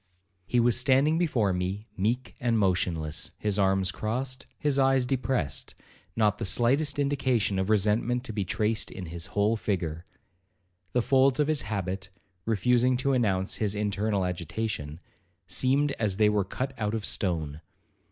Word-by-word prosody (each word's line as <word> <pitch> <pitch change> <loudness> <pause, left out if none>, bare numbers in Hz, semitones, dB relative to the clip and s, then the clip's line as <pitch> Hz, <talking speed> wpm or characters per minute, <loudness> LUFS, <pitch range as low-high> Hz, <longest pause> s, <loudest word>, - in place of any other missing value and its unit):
He 125 - +2
was 120 0 +3
standing 140 +5 +3
before 120 - +1
me 95 +4 -3
meek 115 +6 -1
and 120 -2 +1
motionless, 85 -6 0
his 105 -1 -1
arms 95 -1 +2
crossed, 130 +6 -3
his 145 -2 +1
eyes 135 -1 +3
depressed, 125 - -2 0.4
not 105 -2 +2
the - - -3
slightest 135 +9 +2
indication 130 -8 +1
of 95 +2 -1
resentment 110 +4 +2
to 115 - -5
be 105 -2 -1
traced 105 +4 -1
in 95 - -7
his 85 +2 -6
whole 105 +2 +3
figure. 85 -6 -3 0.9
The 125 - +2
folds 135 +1 +3
of 150 - +3
his 155 -4 +1
habit, 95 -2 -4 0.4
refusing 125 +4 +2
to 135 +2 0
announce 100 -6 0
his 105 -2 -1
internal 105 -1 0
agitation, 85 -3 -4 0.5
seemed 135 +10 +1
as 105 -4 0
they 105 -1 +4
were 105 -2 +1
cut 130 +7 -4
out 105 0 -1
of 110 - -3
stone. 80 -5 -1
110 Hz, 150 wpm, -27 LUFS, 95-125 Hz, 0.9 s, they